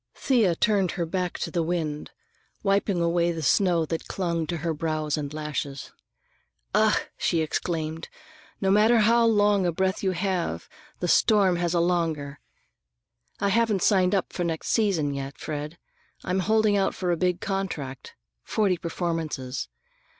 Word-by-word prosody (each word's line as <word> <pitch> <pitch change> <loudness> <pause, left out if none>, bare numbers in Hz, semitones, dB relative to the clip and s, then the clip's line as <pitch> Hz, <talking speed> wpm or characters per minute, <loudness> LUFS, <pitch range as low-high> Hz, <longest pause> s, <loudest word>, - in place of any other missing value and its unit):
Thea 225 -10 +2
turned 195 -2 +1
her 175 -3 -2
back 180 +1 -2
to - - -4
the 170 - 0
wind, 160 -3 -2 0.5
wiping 195 -2 +1
away 170 0 +2
the 165 -2 -5
snow 170 +4 +3
that 165 +1 -4
clung 170 -4 -2
to 170 - -2
her 165 - +1
brows 155 -1 -1
and 145 -2 -4
lashes. 150 -2 -5 0.8
"Ugh!" - - +4 0.2
she 165 - +1
exclaimed; 160 0 -3 0.5
"no 190 -1 +1
matter 220 +3 +5
how 230 +2 +4
long 205 -3 +3
a - - +1
breath 190 +3 -1
you 190 -1 0
have, 185 -1 -2 0.3
the 175 - 0
storm 195 -1 +4
has 175 0 0
a - - +3
longer. 165 -5 -1 1.0
I 200 - +1
haven't 215 -2 +2
signed 190 -1 +3
for 175 - -3
next 165 -2 -3
season, 185 -10 +1
yet, 135 -2 -6
Fred. 150 +2 -5 0.5
I'm 185 +1 -1
holding 215 +1 +2
out 195 -1 +1
for 180 -2 -1
a - - +2
big 180 +1 0
contract: 165 - -4 0.3
forty 200 -5 +1
performances. 165 -6 -3
175 Hz, 150 wpm, -26 LUFS, 160-195 Hz, 1.0 s, matter